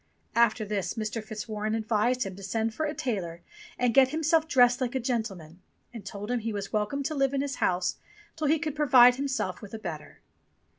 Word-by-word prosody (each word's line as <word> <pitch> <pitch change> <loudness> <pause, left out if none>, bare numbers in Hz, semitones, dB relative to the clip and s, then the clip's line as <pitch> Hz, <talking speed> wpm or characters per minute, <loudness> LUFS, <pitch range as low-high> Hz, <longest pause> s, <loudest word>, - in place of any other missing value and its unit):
After 230 -1 +3
this 205 -2 -2
Mr. 220 0 -3
Fitzwarren 215 0 -4
advised 225 +3 +1
him 195 -3 -6
to 200 - -11
send 220 +3 -2
for 310 +6 -2
a 300 - -3
tailor 175 -8 -3 0.3
and 245 -2 +1
get 260 +1 +6
himself 320 +2 +1
dressed 245 -3 +4
like 250 0 -1
a - - +1
gentleman, 195 -9 -4 0.3
and 230 -4 -8
told 205 +3 -6
him 245 - +1
he 225 0 -3
was 200 -2 -5
welcome 215 +7 -1
to 310 - -2
live 275 -1 +1
in 270 - +1
his 280 -1 -3
house 180 0 0 0.4
till 310 -2 -1
he 315 +3 +4
could 310 -1 -4
provide 250 -4 +6
himself 275 -2 -2
with 210 0 -8
a - - -4
better. 170 -8 -8
230 Hz, 205 wpm, -28 LUFS, 210-270 Hz, 0.4 s, get